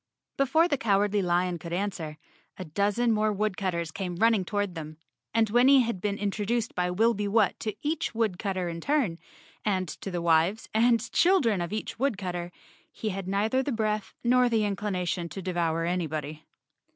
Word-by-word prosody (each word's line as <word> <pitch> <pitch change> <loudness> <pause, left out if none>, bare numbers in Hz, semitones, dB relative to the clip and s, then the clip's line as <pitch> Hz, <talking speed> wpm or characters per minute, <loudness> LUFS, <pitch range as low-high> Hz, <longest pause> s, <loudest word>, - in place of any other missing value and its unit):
Before 280 +5 +3
the 285 -6 -1
Cowardly 205 -1 +2
Lion 175 -1 0
could 170 +1 -7
answer, 175 -5 -3 0.4
a 185 - -6
dozen 205 +8 +1
more 215 0 +2
woodcutters 185 -5 -1
came 180 0 -4
running 225 +1 +3
toward 205 0 -2
them 155 -2 -7 0.3
and 225 -2 +2
when 245 +3 +5
he 275 -1 +7
had 230 -6 -2
been 205 0 -1
introduced 210 +3 -1
by 180 0 0
Wilby 210 +2 +2
Whut 210 +1 +2
to 215 -3 -3
each 315 +2 -1
wood¬ 220 -6 0
cutter 185 -3 -2
in 170 -1 -5
turn, 255 - 0 0.4
and 190 -3 0
to 160 - -7
the 175 -2 -2
wives 170 +5 +2
and 230 0 +3
children 275 - +3
of 175 - -3
each 215 +1 -4
woodcutter, 185 -9 -2 0.4
he 220 - -4
had 195 -1 -4
neither 215 +7 +1
the 275 - -2
breath 215 -3 -2
nor 250 +1 +4
the 225 -2 +2
inclina¬ 200 -3 -2
tion 170 -1 -2
to 195 - -7
devour 170 -3 -1
anybody. 155 -3 -3
200 Hz, 175 wpm, -27 LUFS, 175-225 Hz, 0.4 s, he